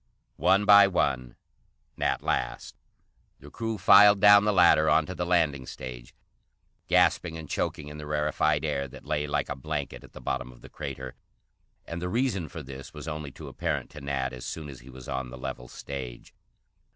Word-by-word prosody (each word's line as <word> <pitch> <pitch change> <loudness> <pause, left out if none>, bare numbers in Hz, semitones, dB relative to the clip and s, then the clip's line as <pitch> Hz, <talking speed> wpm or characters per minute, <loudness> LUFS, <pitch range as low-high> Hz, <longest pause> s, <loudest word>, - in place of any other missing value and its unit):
One 95 +3 +4
by 100 -1 +8
one, 65 -9 -1 0.6
Nat - - -1
last, - - -2 0.6
the - - -13
crew 115 -1 -3
filed 105 0 +7
down 100 0 +7
the 105 - +3
ladder 80 -5 +5
onto 80 +3 +2
the 90 0 -3
landing 80 -7 +1
stage, - - -9 0.7
gasping 80 -1 +2
and 80 -1 -8
choking 75 - -3
in 75 +1 -9
the 75 - -8
rarefied 75 0 0
air 70 -2 -1
that - - -13
lay 75 -1 -1
like - - -1
a 65 - -4
blanket 70 +1 -5
at - - -16
the - - -10
bottom 65 - -3
of - - -18
the - - -13
crater. 65 -1 -7 0.7
And 85 +1 -6
the 90 - -2
reason 115 -7 0
for 80 - -8
this 70 +4 -10
was 75 0 -8
only 75 -2 -5
too 65 - -11
apparent - - -3
to 75 - -10
Nat 70 -2 -2
as 65 0 -8
soon 75 +3 -6
as 65 - -10
he 65 +2 -15
was 65 -1 -11
on 65 -1 -3
the 65 - -9
level 60 -1 -6
stage. 65 -3 -8
75 Hz, 190 wpm, -27 LUFS, 65-90 Hz, 0.7 s, by